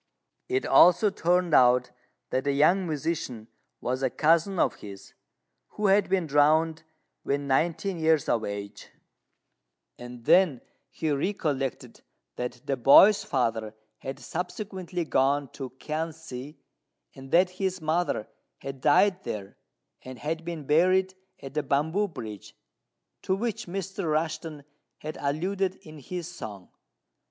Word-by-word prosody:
It 390 +1 0
also 180 +4 +6
turned 180 -2 +1
out 125 -1 +5 0.4
that 130 - -1
the 140 - +1
young 175 +6 +3
musician 150 -7 -3 0.3
was 130 +1 -2
a 130 - +1
cousin 165 +7 +2
of - - +1
his, 100 -1 -11 0.6
who 210 - -1
had 200 +1 +3
been 185 -2 +1
drowned 155 +2 +3 0.4
when 140 0 -2
nineteen 170 +6 0
years 160 -2 +2
of 115 -2 +1
age; 100 -1 -6 1.1
and 120 -1 -10
then 175 -10 +4 0.3
he 160 -2 -2
recollected 140 - -2 0.3
that 125 0 -5
the 135 - -1
boy's 195 - +7
father 115 -4 -1 0.2
had 135 0 -6
subsequently 180 -1 -5
gone 140 -1 +1
to 135 -2 -7
Kiang 160 +1 -3
si, 150 -2 -9 0.6
and 135 0 -12
that 180 +4 +4
his 185 -1 -1
mother 160 -7 -1 0.3
had 135 -1 -8
died 190 +7 +3
there, 100 - -6 0.5
and 130 0 -9
had 160 +4 -4
been 165 -3 -6
buried 185 +5 +3 0.3
at 135 - -8
the 150 - 0
Bamboo 160 +9 0
Bridge, 110 - -9 0.7
to 190 - 0
which 225 0 -3
Mr. 195 +1 -4
Rushten 155 -1 -2 0.3
had 155 +1 -7
alluded 185 +7 -1
in 155 -1 -12
his 175 +4 -6
song. 105 - -9
155 Hz, 130 wpm, -27 LUFS, 135-180 Hz, 1.1 s, boy's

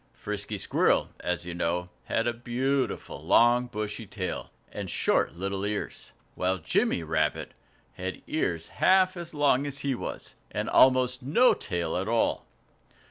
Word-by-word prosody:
Frisky 105 0 -4
Squirrel, - - +2
as 90 0 -2
you 90 - -5
know, 85 +1 -1 0.2
had 115 - 0
a 120 - +1
beautiful, 130 +3 -2
long, 120 +1 +4
bushy 105 -1 -5
tail, 95 -3 -4 0.2
and - - -5
short - - +1
little 95 +2 -3
ears; 105 0 -4 0.2
while 95 +1 0
Jimmy 80 0 0
Rabbit 80 0 -1 0.4
had 95 +1 -6
ears 85 - -1
half 185 0 +4
as 170 -2 -7
long 145 -1 +3
as 140 -1 -4
he 140 - +1
was, 120 - -6 0.2
and - - -3
almost 130 0 +4
no 160 - +4
tail 85 -3 -3
at 95 +2 -2
all! 115 0 +1
110 Hz, 145 wpm, -28 LUFS, 90-130 Hz, 0.4 s, long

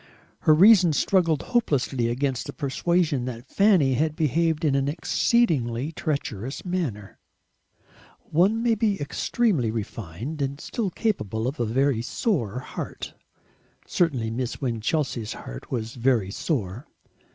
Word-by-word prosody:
Her 155 - +5
reason 185 -2 +7
struggled 165 -1 +2
hopelessly 140 - 0
against 130 +1 -1
the - - -6
persuasion 150 -1 0
that 120 -1 -6
Fanny 185 -10 +4
had 155 +4 0
behaved 160 +2 +1
in 145 - +3
an 135 0 +1
exceedingly 150 - +1
treacherous 135 - -4
manner. 150 - -3 1.1
One 200 +8 +3
may 235 -1 +3
be 210 -2 0
extremely 145 - 0
refined 110 - -5
and 140 +1 -2
still 215 +3 -3
capable 115 - -2
of 135 +2 -4
a 120 - 0
very 130 +1 +1
sore 125 - -1
heart. - - -7 0.7
Certainly 130 -11 0
Miss 125 +1 -3
Winchelsea's 120 -1 -1
heart - - -9
was 115 -3 -3
very 120 -6 +1
sore. 115 - -3
140 Hz, 125 wpm, -25 LUFS, 120-170 Hz, 1.1 s, reason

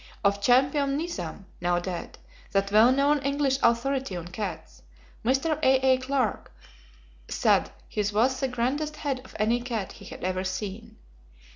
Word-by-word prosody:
Of 200 0 +2
Champion 275 +4 +3
Nizam 250 - -5 0.2
(now 175 0 +2
dead) 175 0 -5 0.4
that 195 0 +1
well 220 +4 +7
known 285 +2 +3
English 275 -1 +1
authority 240 -1 +1
on 175 0 -6
cats, 175 -4 -6 0.4
Mr. 270 +6 +1
A.A. 260 -1 +4
Clark, 255 -4 -1 0.8
said - - +2 0.2
his 210 -1 -1
was 250 +5 +2
the 270 - +1
grandest 265 +5 -1
head 280 -4 -3
of - - -15
any 230 +3 +1
cat 230 -5 -3
he - - -13
had - - -9
ever 185 0 -1
seen. 210 +4 -5
245 Hz, 145 wpm, -27 LUFS, 200-275 Hz, 0.8 s, well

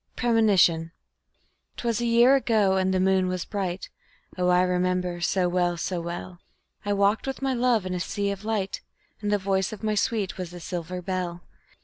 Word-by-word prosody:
Premonition 195 -9 +3 0.8
'Twas 235 -1 -1
a 240 - 0
year 235 +3 +6
ago 215 -7 +2
and 190 0 +1
the 185 - +1
moon 190 0 +3
was 185 -1 -2
bright 190 -3 -4 0.4
(Oh, 180 -1 0
I 180 0 +4
remember 180 -1 0
so 180 +1 +1
well, 175 -1 0
so 175 +1 -2
well); 175 +1 -6 0.4
I 205 - -2
walked 200 +4 +2
with 270 0 -4
my 270 -1 +1
love 240 -5 +2
in 185 - -3
a 180 - -2
sea 200 +3 -2
of 200 0 -6
light, 210 -3 -2 0.4
And 205 -1 -1
the 205 - +3
voice 190 -1 0
of 215 0 -9
my 215 0 +1
sweet 205 -2 -1
was 180 -1 -5
a - - -7
silver 180 +1 -5
bell. 180 -2 -3
190 Hz, 190 wpm, -26 LUFS, 180-215 Hz, 0.8 s, year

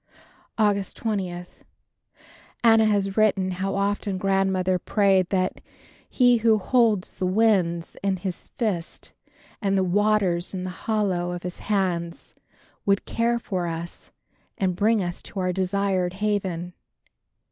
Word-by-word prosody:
August 205 -3 +1
20. 185 -5 -3 1.2
Anna 225 -1 +6
has 200 -2 +1
written 195 -3 +3
how 190 +2 -2
often 200 0 -1
Grandmother 190 -1 +1
prayed 190 -2 +2
that 185 -1 -1 0.5
"He 245 -2 +4
who 225 -1 +4
holds 215 -2 +1
the 185 -1 -1
winds 185 -5 +2
in 195 -1 0
his 180 0 -5
fists 195 -8 -3 0.5
and 195 -2 +1
the 190 - +3
waters 190 -2 +1
in 180 - -4
the 185 - -4
hollow 190 -3 -1
of 175 - -6
his 180 0 -6
hands, 180 -5 -2 0.5
would 200 -1 +1
care 235 +1 0
for 185 -6 -3
us 165 +1 -6 0.5
and 185 -2 0
bring 215 +1 +2
us 175 -1 -4
to 195 - -7
our 185 -1 0
desired 190 -1 0
haven." 190 -4 -2
195 Hz, 130 wpm, -24 LUFS, 180-210 Hz, 1.2 s, Anna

